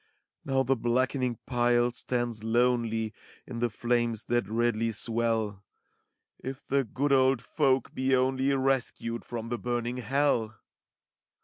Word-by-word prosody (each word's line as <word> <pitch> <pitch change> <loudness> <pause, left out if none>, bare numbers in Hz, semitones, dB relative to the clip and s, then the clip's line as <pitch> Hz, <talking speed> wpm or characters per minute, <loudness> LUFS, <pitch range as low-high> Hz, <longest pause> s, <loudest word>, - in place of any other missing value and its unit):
Now 135 -1 +1
the 135 +1 +2
blackening 125 +1 0
pile 120 -1 +2
stands 120 -2 -2
lonely 115 -1 +1 0.3
In 120 -3 -6
the 120 0 +1
flames 120 0 0
that 120 -4 +1
redly 115 0 +1
swell: 110 -2 -1 0.8
If 135 0 -7
the 140 0 +1
good 135 +5 -1
old 130 -1 +4
folk 135 -2 +1
be 130 0 +2
only 130 +1 +2
Rescued 130 -3 -1
from 115 -1 -5
the 120 -1 -2
burning 120 0 -2
hell! 125 -3 +1
120 Hz, 125 wpm, -29 LUFS, 115-130 Hz, 0.8 s, old